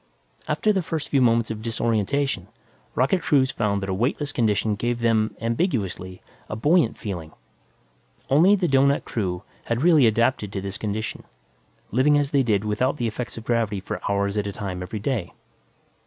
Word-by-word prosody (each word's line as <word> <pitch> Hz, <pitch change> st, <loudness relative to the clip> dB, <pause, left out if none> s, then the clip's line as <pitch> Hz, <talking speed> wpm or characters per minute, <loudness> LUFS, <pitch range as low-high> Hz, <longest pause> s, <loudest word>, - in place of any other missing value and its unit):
After 215 Hz, -, +2 dB
the 190 Hz, -, +1 dB
first 160 Hz, -2 st, -4 dB
few 140 Hz, -, +3 dB
moments 115 Hz, -2 st, +3 dB
of 110 Hz, -1 st, -5 dB
disorientation, 115 Hz, +4 st, -1 dB, 0.5 s
rocket 140 Hz, +9 st, +2 dB
crews 140 Hz, -4 st, +3 dB
found 100 Hz, -2 st, -1 dB
that -, -, -3 dB
a -, -, 0 dB
weightless 135 Hz, +8 st, -1 dB
condition 110 Hz, -4 st, +1 dB
gave 120 Hz, +3 st, -1 dB
them, 115 Hz, -2 st, +1 dB
ambiguously, 115 Hz, -, -2 dB, 0.3 s
a -, -, -3 dB
buoyant 145 Hz, +2 st, +2 dB
feeling. 85 Hz, -7 st, -6 dB, 0.9 s
Only 170 Hz, +9 st, +5 dB
the 185 Hz, -3 st, 0 dB
doughnut 140 Hz, 0 st, +3 dB
crew 90 Hz, -4 st, -3 dB, 0.2 s
had 115 Hz, +3 st, -1 dB
really 160 Hz, -7 st, +6 dB
adapted 115 Hz, -2 st, +1 dB
to 100 Hz, -, -2 dB
this 100 Hz, 0 st, -5 dB
condition, 110 Hz, 0 st, -4 dB, 0.7 s
living 140 Hz, +6 st, +4 dB
as 145 Hz, -1 st, 0 dB
they 140 Hz, -, +3 dB
did 110 Hz, -5 st, +1 dB
without 125 Hz, +7 st, 0 dB
the 120 Hz, -, -1 dB
effects 115 Hz, +2 st, -4 dB
of 115 Hz, -, -8 dB
gravity 115 Hz, -4 st, 0 dB
for 95 Hz, -, -5 dB
hours 100 Hz, +1 st, 0 dB
at 105 Hz, -1 st, 0 dB
a -, -, -2 dB
time 95 Hz, -3 st, -5 dB
every 90 Hz, +4 st, -5 dB
day. 105 Hz, -4 st, -2 dB
115 Hz, 170 wpm, -24 LUFS, 105-140 Hz, 0.9 s, really